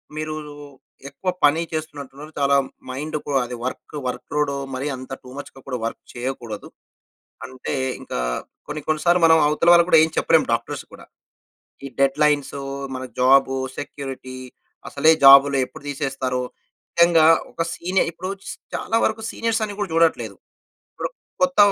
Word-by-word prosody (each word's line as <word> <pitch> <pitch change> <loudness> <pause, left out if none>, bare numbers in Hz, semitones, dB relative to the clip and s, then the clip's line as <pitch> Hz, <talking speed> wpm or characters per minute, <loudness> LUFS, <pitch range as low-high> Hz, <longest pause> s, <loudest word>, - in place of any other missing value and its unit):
మీరు 155 0 -3 0.7
ఎక్కువ 160 +7 -4 0.2
పని 150 +3 +4
చేస్తున్నట్టున్నారు. 150 -2 -6
చాలా 140 0 +3 0.4
మైండ్‌కు 150 +2 -4
అది 125 0 -6
వర్క్, 130 +3 -6
వర్క్ - - -7
లోడు 150 -1 +1 0.2
మరీ 130 +3 -3
అంత 130 +1 -11
టు 130 - -12
మచ్‌గా 135 -1 -9
కూడా 130 -2 -2
వర్క్ 115 - -5
చేయకూడదు. 120 -4 -5 0.8
అంటే 130 0 -6 0.3
ఇంకా - - -5 0.5
కొన్ని, 150 0 -5
కొన్ని 155 -1 0
సార్లు 175 +1 +4
మనం 160 0 +7
అవతల 155 +3 +2
వాళ్ళకి 170 0 +6
కూడా - - +7
ఏం 160 - +2
చెప్పలేం - - +4
డాక్టర్స్ - - -2
కూడా. - - -12 0.8
ఈ - - -5
డెడ్‌లైన్స్ 145 +1 +2 0.4
మన 130 0 -5 0.2
జాబు 135 +1 +5 0.2
సెక్యూరిటీ 135 -2 -7 0.5
అసలే 150 +3 +4
జాబ్‌లు 140 +1 +9
ఎప్పుడు - - -14
తీసేస్తారో. 135 -2 -2 0.6
నిజంగా 170 -2 +6 0.3
ఒక 165 - -2
సీనియర్ 185 +1 0
ఇప్పుడు 185 +3 -6 0.4
చాలా 225 - -1
వరకు 220 0 0
సీనియర్స్ 230 -1 -1
అని 205 -1 -8
కూడా 205 -4 -2
చూడట్లేదు. 165 0 +2 0.6
ఇప్పుడు - - -4 0.3
కొత్త 275 0 +1
145 Hz, 140 wpm, -22 LUFS, 135-165 Hz, 0.8 s, జాబ్‌లు